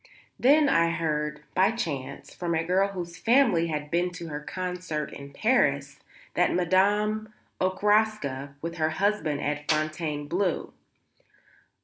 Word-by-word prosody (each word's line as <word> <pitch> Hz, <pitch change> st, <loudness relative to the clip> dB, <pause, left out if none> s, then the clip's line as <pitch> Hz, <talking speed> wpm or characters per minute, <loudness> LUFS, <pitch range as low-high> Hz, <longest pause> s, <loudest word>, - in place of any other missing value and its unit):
Then 290 Hz, +4 st, +5 dB
I 165 Hz, -9 st, +3 dB
heard, 150 Hz, -2 st, -2 dB
by 190 Hz, +2 st, +4 dB
chance, 140 Hz, -, -4 dB
from 170 Hz, -2 st, -2 dB
a 160 Hz, -, +1 dB
girl 185 Hz, +3 st, +2 dB
whose 175 Hz, -4 st, -7 dB
family 230 Hz, -9 st, +4 dB
had 150 Hz, -2 st, -4 dB
been 175 Hz, +1 st, +1 dB
to 170 Hz, -1 st, -7 dB
her 150 Hz, -1 st, -4 dB
concert 180 Hz, -2 st, -4 dB
in 140 Hz, 0 st, -9 dB
Paris, 140 Hz, -, +1 dB, 0.3 s
that 180 Hz, -, +2 dB
Madame 205 Hz, +4 st, +2 dB, 0.3 s
Okraska 185 Hz, -8 st, +1 dB
was 165 Hz, -, -2 dB
with 170 Hz, -, -11 dB
her 155 Hz, 0 st, +2 dB
husband 190 Hz, -8 st, 0 dB
at 150 Hz, 0 st, -3 dB
Fontainebleau. 155 Hz, +3 st, -1 dB
170 Hz, 130 wpm, -27 LUFS, 150-200 Hz, 0.3 s, Then